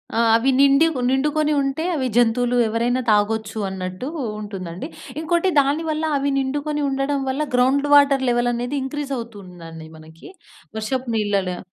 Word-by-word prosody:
ఆ! - - +1 0.2
అవి 235 +4 +2
నిండుక్ 280 +2 +4
నిండుకొని 300 +3 +1
ఉంటే, 275 +3 -2
అవి 260 -3 -1
జంతువులు 245 +1 +2
ఎవరైనా 240 +3 0
తాగొచ్చు 215 +1 0
అన్నట్టు 185 +4 -5 0.3
ఉంటుందండి. 190 - -6 0.3
ఇంకోటి, 340 +3 +1
దాని 285 +4 -1
వల్ల 310 +1 -2
అవి 280 +1 -1
నిండుకొని 290 +2 -2
ఉండడం 275 +1 -1
వల్ల, 270 +3 -2
గ్రౌండ్ 270 +3 +2
వాటర్ 280 -2 +5
లెవెల్ 240 0 +1
అనేది 245 +4 -3
ఇంక్రీజ్ 280 +1 -5
అవుతుందండి 180 -8 -10
మనకి. 160 - -14 0.5
వర్షపు 250 +3 -3
నీళ్ళలో 200 -4 -1
255 Hz, 140 wpm, -21 LUFS, 210-280 Hz, 0.5 s, వాటర్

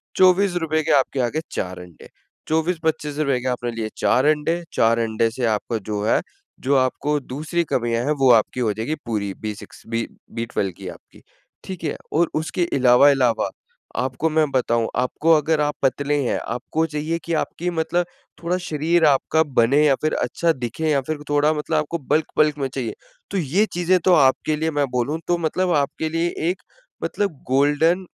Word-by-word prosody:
₹24 180 -4 +3
के 160 - 0
आपके 135 0 0
आ 120 - +2
गए 155 - -2
4 90 0 -4
अंडे, 90 -2 -13 0.4
₹24-₹25 155 -4 0
के 130 - -4
आपने 120 -1 -2
लिए 115 -1 -4
4 130 - +2
अंडे, 155 +3 +1
4 115 +1 +3
अंडे 115 0 +1
से 120 +1 -2
आपका 110 +1 -1
जो 105 -1 -2
है, - - +3 0.4
जो 140 +2 +1
आपको 145 +3 0
दूसरी 155 +6 -2
कमियाँ 120 -1 0
हैं 150 - +2
वो 130 -2 +6
आपकी 115 +3 +2
हो 110 -4 +1
जाएगी 115 +9 -3
पूरी, 100 -3 -2
B6-B12 115 -1 -5
की - - -8
आपकी - - -14 0.4
ठीक 185 -3 -7
है 150 - -2 0.2
और 165 +2 +3
उसके 160 +3 -1
इलावा 130 +2 +6
इलावा 125 -4 +1 0.5
आपको 130 +5 -1
मैं 155 -1 +2
बताऊँ 115 -3 +1
आपको 140 +6 +1
अगर 155 0 +2
आप 150 0 0
पतले 145 +2 +1
हैं - - 0
आपको 155 +6 -2
चाहिए 155 +2 -2
कि 170 - -2
आपकी 175 +3 -2
मतलब 175 +1 0 0.4
थोड़ा 180 +2 0
शरीर 160 +1 +2
आपका 150 +2 +3
बने 140 0 +3
या 140 -2 +4
फ़िर 155 - 0
अच्छा 165 +7 0
दिखे 130 +5 -3
या 145 -2 +3
फ़िर 150 +2 -5
थोड़ा 145 +1 +3
मतलब 155 +1 -2
आपको 155 +2 -1
बल्क-बल्क 150 -1 +2
में 135 - 0
चाहिए। 130 -4 -3 0.4
तो 195 - -1
ये 180 +6 +2
चीज़ें 175 +1 +2
तो 185 - +6
आपके 150 0 +3
लिए 160 +1 -1
मैं 145 -1 +1
बोलूँ 125 +6 -1
तो 175 0 +2
मतलब 175 +2 0
आपके 150 +2 -1
लिए 165 +1 0 0.2
एक 185 - -3 0.4
मतलब 195 -9 -2
गोल्डन 150 +7 +3
150 Hz, 175 wpm, -22 LUFS, 125-160 Hz, 0.5 s, वो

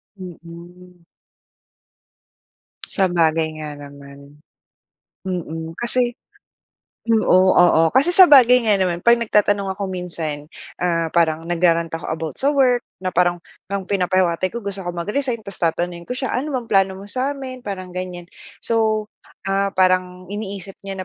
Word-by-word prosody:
Mm. 175 -1 -12 1.8
Sabagay 165 -4 +1
nga 150 -1 -6
naman. 140 0 -13 0.9
Mm, 165 -3 -5
kasi, 240 0 0 0.9
oo, 190 -5 +4
oo. 175 -2 +5
Kasi 270 +7 +4
sabagay 265 -10 +7
nga 210 -2 +4
naman, 175 -2 0
'pag 235 0 +6
nagtatanong 205 -3 +1
ako 200 - -3
minsan, 165 -5 -5 0.3
ah, 165 -2 0
parang 165 -1 +1
nagra-rant 170 -1 +1
ako 165 -1 -5
about 160 -1 -4
sa 280 - +3
work, 255 -4 +3 0.2
na 185 -1 -4
parang 175 0 +2 0.3
ng 200 -1 -2
pinapahiwatig 185 -2 +1
ko 235 - -6
gusto 200 -1 -3
ko 175 - -5
mag-resign 225 +8 -2
tapos 200 -2 -9
tatanungin 170 +1 -2
ko 250 - -3
siya, 260 -1 -3
ano 270 +5 -2
bang 240 -2 -7
plano 195 -2 +2
mo 200 - -10
sa 255 +6 -2
amin, 260 -3 -7
parang 185 -4 -7
ganyan. 180 -1 -6 0.3
So, 220 -2 0 0.4
ah, 195 0 +1
parang 185 -1 +1
iniisip 200 -2 -6
niya 195 -1 -6
185 Hz, 135 wpm, -20 LUFS, 170-215 Hz, 1.8 s, sabagay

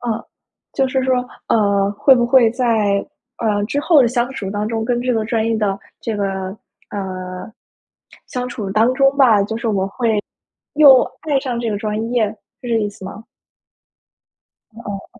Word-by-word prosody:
呃， 230 -3 -3 0.5
就 265 -1 +1
是 260 0 0
说， 260 -1 +2 0.3
呃， 200 -2 +2
会 265 +6 +5
不 240 -1 +2
会 240 -2 +5
在， 220 -5 +1 0.3
呃， 210 -3 0
之 285 +5 -1
后 320 -1 +5
的 240 - +3
相 245 +1 -1
处 205 -8 -5
当 210 +1 -2
中 225 -1 -2
跟 240 +1 0
这 250 0 0
个 220 -1 0
专 225 -1 -1
业 225 -1 +1
的 200 -2 -1 0.2
这 225 -3 -3
个， 200 - -1 0.7
呃， 185 -1 -6 0.8
相 250 -1 -4
处 215 -5 -5
当 225 +5 +3
中 275 +1 +3
吧， 225 -7 +5
就 220 +2 -3
是 230 0 -3
我 195 -2 0
会， 220 -1 -1 0.5
又 280 -4 +7 0.2
爱 295 -3 +1
上 245 -3 -3
这 230 - -2
个 205 - -1
专 215 +2 -3
业， 225 -4 +2 0.3
是 245 - -6
这 230 - +2
意 210 - -1
思 205 -1 -12
吗？ 210 +4 -9 1.5
嗯。 205 -3 -9
225 Hz, 190 characters per minute, -19 LUFS, 205-250 Hz, 1.5 s, 又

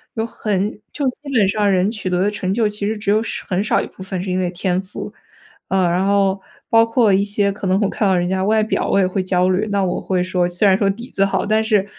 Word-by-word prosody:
有 225 -1 -1
很 210 -2 -2 0.2
就 285 -3 -2
基 280 +3 -4
本 215 -7 +3
上 205 0 +1
人 190 +2 +2
取 210 -4 -4
得 180 0 0
的 205 - +1
成 190 -3 -3
就 220 +2 +2
其 210 -1 -3
实 220 0 -2
只 205 -1 -1
有 215 +1 +3 0.3
很 190 +1 0
少 215 - +2
一 - - -2
部 - - -14
分 190 -1 -4
是 185 - -3
因 185 - 0
为 180 -1 0
天 180 +1 -1
赋。 190 +1 -8 0.6
“呃， 190 -1 +2
然 185 +3 +1
后 195 -1 +2 0.3
包 225 0 +5
括 230 -2 +2
一 195 - +3
些 205 0 +1
可 200 0 -5
能 185 +1 +2
我 200 - +1
看 205 - 0
到 190 - +3
人 175 0 0
家 190 0 0
外 215 +3 +2
表， 215 - -1
我 - - +2
也 190 - +3
会 185 +1 -1
焦 185 0 +1
虑。 190 +4 0
那 200 -1 +1
我 180 - -1
会 185 -2 -1
说， 180 -1 0
虽 180 +4 0
然 190 -1 +5
说 200 -1 +1
底 235 +6 -5
子 195 - +2
好， 190 -1 -1
但 215 +1 +2
是 210 -3 +1
195 Hz, 295 characters per minute, -19 LUFS, 185-210 Hz, 0.6 s, 包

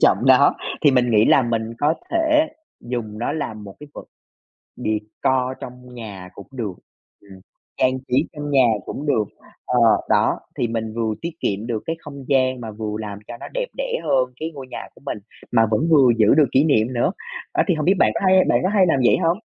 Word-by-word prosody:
trọng - - +5
nó, - - +6 0.3
thì 145 - +6
mình 125 -2 +2
nghĩ 110 -1 +5
là 135 - +5
mình 115 -1 -2
có 150 +2 +2 0.2
thể 320 -2 +3 0.3
dùng 115 -4 -5
nó 120 +5 -2
làm 110 -9 -5
một 100 -1 -10
cái 150 - -10
vật - - -9 0.7
decor 125 +5 -1
trong 125 0 -10
nhà 100 -6 -8
cũng 100 - -11
được, 115 -7 -4 0.5
ừm, 95 -2 -15 0.4
trang 130 0 +2
trí 125 - -1 0.2
trong 145 -1 -6
nhà 135 -3 +5 0.2
cũng 145 - -6
được, 125 -7 +2 0.4
ờ, 125 - +1 0.3
đó - - +2 0.2
thì 120 - 0
mình 110 -1 -3
vừa 115 -2 -1
tiết 170 - -2
kiệm 100 +3 -2
được 115 -3 -3
cái 165 - -2
không 140 -3 -10
gian 130 -2 +2
mà 115 -2 -6
vừa 105 0 -5
làm 105 -2 -6
cho 120 - -7
nó - - -7
đẹp - - -1
đẽ - - -2
hơn 130 -1 +1
cái 160 +1 -3
ngôi 135 -2 -8
nhà - - -6
của - - -19
mình 135 - -3 0.3
mà 115 -2 +4
vẫn 125 +10 +1
vừa 140 -6 +6
giữ 110 -2 +5
được 150 -1 +5
kỷ 135 - +4
niệm 125 -6 +2
nữa. 120 +4 +1 0.5
Đó - - +6
thì 180 - +3
hông 155 -1 -2
biết 185 +5 +4
bạn - - +4
có - - -2
hay 185 0 +5
bạn - - +3
có 185 - +1
hay 195 -2 +3
làm 160 -5 +2
vậy - - +5
hông? 170 +3 +2
125 Hz, 220 wpm, -21 LUFS, 110-150 Hz, 0.7 s, nó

